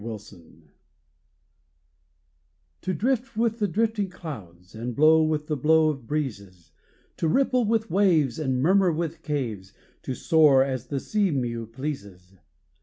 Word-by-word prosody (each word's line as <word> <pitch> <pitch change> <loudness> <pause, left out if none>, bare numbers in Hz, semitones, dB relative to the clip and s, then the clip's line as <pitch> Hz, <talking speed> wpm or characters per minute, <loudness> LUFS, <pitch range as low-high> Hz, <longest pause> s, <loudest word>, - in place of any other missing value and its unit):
WILDNESS 110 -2 -8 2.5
To 185 - -2
drift 255 +3 -1
with 230 0 0
the 205 - +1
drifting 210 +1 0
clouds, 95 - -10
And 115 +2 -5
blow 160 +2 +5
with 155 -1 0
the 150 - -2
blow 155 +3 +3
of 135 -6 -5
breezes, 100 - -5 0.5
To 165 - 0
ripple 255 - +2
with 220 -2 0
waves 165 - +2
and 130 -4 -1
murmur 190 +2 +4
with 165 0 -3
caves 115 -11 -4 0.3
To 130 - -4
soar, 150 -4 +4
as 130 -2 -4
the 140 0 -2
sea 205 +6 0
mew 120 -6 -2
pleases! 100 -8 -7
150 Hz, 135 wpm, -25 LUFS, 120-185 Hz, 2.5 s, blow